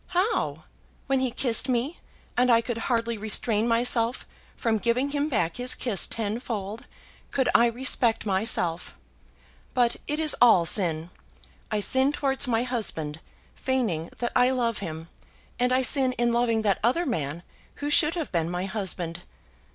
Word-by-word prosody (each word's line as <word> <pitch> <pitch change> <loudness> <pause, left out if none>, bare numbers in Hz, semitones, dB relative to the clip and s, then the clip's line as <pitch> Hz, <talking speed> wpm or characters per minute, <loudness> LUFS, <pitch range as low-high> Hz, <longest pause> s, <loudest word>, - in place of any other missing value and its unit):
"How; 415 +5 0 0.4
when 270 -1 +1
he 260 -1 0
kissed 240 +1 +1
me, 255 +7 -1 0.4
and 250 0 +3
I 230 - +6
could 230 0 -4
hardly 230 -2 0
restrain 220 +1 0
myself 235 0 +2 0.3
from 225 -2 0
giving 250 +6 0
him 290 +1 -1
back 210 - -1
his 250 +1 -1
kiss 220 -7 -1
tenfold, 220 -1 -4 0.4
could 265 -2 0
I 235 - +5
respect 235 -1 0
myself? 190 -4 -1 0.8
But 240 -2 +2
it 300 +1 -1
is 310 -2 +3
all 225 -8 +6
sin. 165 -2 +2 0.6
I 210 -1 -1
sin 265 +6 +2
towards 270 -2 0
my 230 -1 +1
husband, 165 -12 -1 0.3
feigning 220 -12 -2
that 240 - -2
I 250 - +4
love 240 -4 0
him; 160 -4 -6 0.5
and 250 +1 +2
I 260 +1 +2
sin 260 0 +3
in 240 -1 0
loving 235 -2 +1
that 200 -3 +1
other 295 +10 +2
man, 160 - -3 0.3
who 290 0 -4
should 310 +2 +4
have 330 -4 -4
been 170 -2 0
my 180 +1 -3
husband. 185 -4 -4
235 Hz, 155 wpm, -26 LUFS, 200-255 Hz, 0.8 s, I